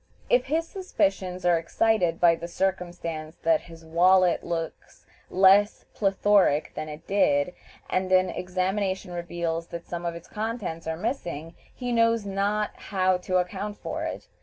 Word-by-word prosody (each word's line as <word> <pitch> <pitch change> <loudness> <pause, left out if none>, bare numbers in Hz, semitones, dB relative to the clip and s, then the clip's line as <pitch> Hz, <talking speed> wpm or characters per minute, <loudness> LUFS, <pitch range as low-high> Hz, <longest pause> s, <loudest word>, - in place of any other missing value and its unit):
If - - +4
his 330 +2 0
suspicions 190 - -1
are 175 -1 +4
excited 180 0 +1
by 170 -1 +6
the 170 +1 -5
circumstance 175 -4 -3
that 165 -1 +3
his 165 -1 -14
wallet 180 +2 +4
looks 165 -1 -5 0.2
less 195 +2 +4
plethoric 195 -6 +2
than 155 - -5
it 150 +2 -9
did, 180 -5 +2 0.3
and 185 0 -1
an 185 0 +4
examination 185 +1 -2
reveals 170 -1 -3
that 170 0 -7
some 175 0 -5
of 170 - -3
its 170 - -10
contents 210 -7 -4
are 160 0 -2
missing, 175 - -4 0.2
he 245 -1 -5
knows 230 -2 +3
not 200 +2 0
how 185 -2 +1
to 185 +1 -1
account 195 +3 -2
for - - -4
it. - - -5
185 Hz, 150 wpm, -26 LUFS, 170-200 Hz, 0.3 s, by